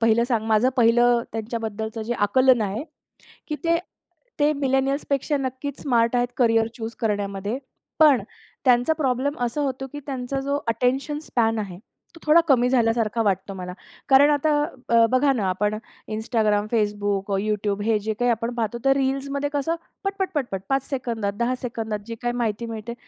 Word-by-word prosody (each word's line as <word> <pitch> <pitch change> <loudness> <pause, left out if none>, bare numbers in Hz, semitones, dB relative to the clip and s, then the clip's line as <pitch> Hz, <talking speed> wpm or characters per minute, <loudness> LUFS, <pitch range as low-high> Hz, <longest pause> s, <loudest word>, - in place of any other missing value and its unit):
पहिलं 230 +1 +4
सांग 225 -4 0
माझं 220 +3 +4
पहिलं 240 0 +4
त्यांच्याबद्दलचं 220 0 -4
जे 235 +2 -2
आकलन 250 +4 +4
आहे, 210 +6 -3 0.6
की 300 - -2
ते 335 0 +3 0.6
ते 295 +1 +4
मिलेनियल्सपेक्षा 275 +1 0
नक्कीच 265 +1 -4
स्मार्ट 235 -3 +2
आहेत 245 0 +2
करिअर 225 -2 +3
चूज 225 0 -5
करण्यामध्ये. 205 0 -2 0.4
पण 295 -7 +6 0.4
त्यांचा 250 +4 +4
प्रॉब्लेम 275 0 0
असा 245 +5 -2
होतो 270 -1 -2
की 290 - -5
त्यांचा 270 -1 -3
जो 280 +1 -1
अटेन्शन 255 +6 0
स्पॅन 225 -7 0
आहे. 195 -4 -5 0.4
तो - - -12
थोडा 310 +2 +6
कमी 250 -4 +4
झाल्यासारखा 230 -2 +2
वाटतो 195 -1 -1
मला. 180 -1 -6 0.4
कारण 275 +2 +7
आता 295 +1 +2 0.4
अ, 230 0 +7
बघा 270 +2 +4
ना 215 -7 -1
आपण 210 +3 0 0.3
Instagram, 215 -1 0
Facebook, 205 -2 0
YouTube 205 -1 -1
हे 225 -1 +3
जे 220 - 0
काही 245 0 +3
आपण 230 +1 -2
पाहतो 230 -1 -2
तर 270 0 +5
रील्समध्ये 275 +1 -1
कसं 290 +3 0 0.3
पटपट-पटपट 370 - -2
5 270 -1 0
सेकंदात, 230 -7 -2
10 240 +2 0
सेकंदात 225 -3 -3
जी 230 - -5
काही 240 0 -1
माहिती 230 -1 -1
मिळते. 225 0 -6
240 Hz, 160 wpm, -24 LUFS, 220-270 Hz, 0.6 s, कारण